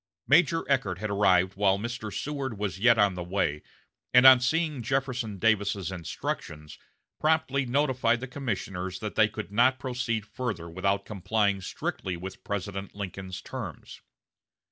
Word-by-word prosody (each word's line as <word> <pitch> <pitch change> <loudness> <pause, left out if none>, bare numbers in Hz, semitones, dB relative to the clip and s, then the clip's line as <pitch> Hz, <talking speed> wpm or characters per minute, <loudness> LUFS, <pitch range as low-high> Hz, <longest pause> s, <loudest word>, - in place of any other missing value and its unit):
Major 165 +2 +4
Eckert 115 -11 +1
had 105 +2 -4
arrived 95 -2 +3
while 100 -1 +3
Mr. 110 0 -5
Seward 135 +2 -4
was 95 -3 -3
yet 120 +2 +5
on 100 -2 +4
the 90 - -5
way, 85 -5 -1 0.5
and 125 +1 +8
on 130 -1 +10
seeing 150 +1 0
Jefferson 125 -4 -2
Davis's 100 -3 +1
instructions, 80 -3 -5 0.4
promptly 155 -4 +1
notified 130 -3 +2
the 130 - -6
commissioners 95 -8 -4
that 105 +2 -5
they 110 - +4
could 110 -1 -7
not 125 +5 +4
proceed 125 -4 -2
further 110 -9 -4
without 100 +4 -1
complying 100 0 0
strictly 90 0 -4
with 95 +2 -8
President 100 -1 -4
Lincoln's 95 -2 -6
terms. - - -8
105 Hz, 145 wpm, -28 LUFS, 95-130 Hz, 0.5 s, on